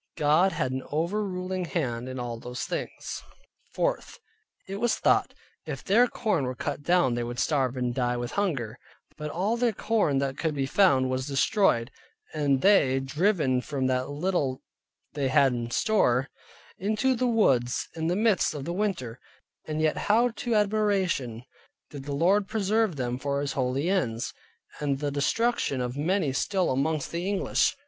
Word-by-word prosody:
God 155 +5 +4
had 130 - -1
an 130 0 -2
over 170 +8 0
ruling 185 -1 -3
hand 130 -8 -2
in 130 - -6
all 120 -2 -4
those 125 +1 -6
things. - - -5 0.5
4. - - +1 0.7
It 195 +1 -5
was 235 +2 +1
thought, - - +2 0.3
if - - -5
their 230 +6 +4
corn 200 - -1
were 125 0 -3
cut 135 - -4
down, 170 -5 +3
they 120 0 -1
would 120 +1 -5
starve 135 -4 0
and 125 -1 -1
die 125 -1 0
with 120 0 -4
hunger, 135 - -2 0.4
and 150 0 -4
all 195 +9 0
their 240 -1 +2
corn 210 -13 +1
that 135 0 -2
could 160 -3 -1
be 135 -1 0
found, 135 -5 +3
was 130 +1 -2
destroyed, 140 - +2 0.4
and 140 -3 +1
they 145 -10 +5
driven 140 -2 +1
from 135 -1 -3
that 130 0 0
little 145 -3 -1 0.5
they 140 -2 -1
had 130 0 +4
in 120 -1 -3
store, 135 - +2 0.5
into 215 +7 +1
the 250 0 0
woods 135 - +2
in 160 -1 -3
the 175 - +1
midst 215 -5 +2
of 140 0 -6
winter; 170 - -2 0.5
and 155 0 -2
yet 155 - +1
how 235 +4 +4
to 235 0 -2
admiration 195 - +1 0.5
did 140 -2 -8
the 145 -1 -3
Lord 195 +6 +3
preserve 215 -2 +1
them 125 -2 -2
for 140 0 -1
His 140 0 -2
holy 130 +4 -1
ends, 125 -12 -1 0.5
and 140 -2 0
the 145 +1 -2
destruction 145 - 0
of 125 0 -3
many 160 0 0
still 185 +6 0
amongst 145 +3 -1
the 175 +3 -2
English! 200 -1 +1
150 Hz, 170 wpm, -27 LUFS, 130-195 Hz, 0.7 s, they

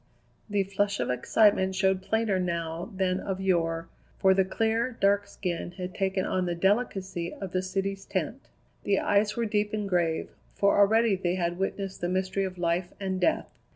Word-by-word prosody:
The 205 -1 +2
flush 200 +1 -1
of - - 0
excitement 190 - +3
showed 190 0 +2
plainer 220 -1 0
now 170 +1 -3
than 185 -1 +1
of 190 -1 -3
yore, 165 -3 0 0.3
for 190 0 +5
the 190 0 +3
clear, 225 +5 0
dark 200 +1 +3
skin 175 -1 -4
had 180 -1 -6
taken 190 -1 0
on 185 -1 0
the 175 - -1
delicacy 190 -3 0
of 195 -3 -6
the 185 - 0
city's 195 +1 -3
tint. - - -3 0.3
The 200 -1 +2
eyes 205 +1 +2
were 235 - +1
deep 210 -1 0
and 210 -2 -1
grave, 170 -4 0 0.2
for 200 0 +3
already 220 +1 +4
they 180 -1 -1
had 175 -1 -1
witnessed 195 0 -3
the 175 - -1
mystery 190 +1 0
of 185 -1 -6
life 175 +1 0
and 190 -1 -2
death. 320 - +2
190 Hz, 180 wpm, -28 LUFS, 180-200 Hz, 0.3 s, for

